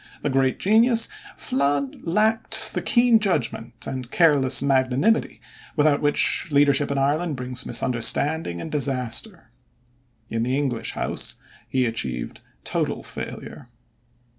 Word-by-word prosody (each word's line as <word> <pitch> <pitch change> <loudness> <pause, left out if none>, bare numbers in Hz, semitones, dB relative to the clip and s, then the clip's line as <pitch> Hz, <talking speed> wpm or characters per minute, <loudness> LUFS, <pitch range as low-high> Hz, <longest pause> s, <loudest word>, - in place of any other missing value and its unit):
A 145 - -1
great 135 -1 +1
genius, 225 +3 +3 0.3
Flood 140 0 -1
lacked 215 +6 +3
the - - -2
keen 240 -2 +3
judgment 125 - -2
and 130 -2 -6
careless 140 -7 +3
magnanimity 135 - +1 0.4
without 145 -1 +2
which 145 0 +2
leadership 145 -1 +2
in 140 - -2
Ireland 150 +4 0
brings 125 0 -2
misunderstanding 130 - +1
and 155 - -7
disaster. 135 - -3 0.8
In 115 0 -3
the 125 +3 -1
English 135 -5 -2
House - - -1 0.3
he 130 -1 0
achieved 65 - -4 0.2
total - - -3
failure. - - -8
140 Hz, 115 wpm, -23 LUFS, 125-160 Hz, 0.8 s, genius